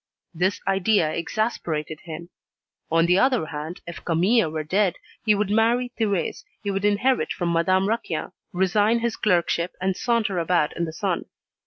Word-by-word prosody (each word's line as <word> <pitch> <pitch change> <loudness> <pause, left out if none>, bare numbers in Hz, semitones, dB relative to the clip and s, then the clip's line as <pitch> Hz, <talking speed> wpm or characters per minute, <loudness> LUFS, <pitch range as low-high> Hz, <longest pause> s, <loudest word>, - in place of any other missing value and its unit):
This 180 +4 0
idea 195 -4 +2
exasperated 165 -5 -2
him. 170 +1 -8 0.6
On 165 +1 +4
the 180 +2 +4
other 255 -7 +3
hand, 155 +2 -6
if 170 - -8
Camille 180 +3 +3
were 155 0 -3
dead, 190 +3 +1 0.3
he 215 -2 +4
would 205 0 -1
marry 235 +3 +2
Thérèse, 200 -5 -1 0.2
he 200 - -1
would 195 +1 -1
inherit 215 +6 +2
from 175 -2 -1
Madame 185 +3 +2
Raquin, 185 -8 -2 0.2
resign 205 +5 +2
his 235 -1 -1
clerkship, 175 -3 +1
and 190 0 0
saunter 215 -4 0
about 170 -2 +1
in 170 - -1
the 160 - -6
sun. 185 +1 -2
185 Hz, 160 wpm, -24 LUFS, 170-215 Hz, 0.6 s, On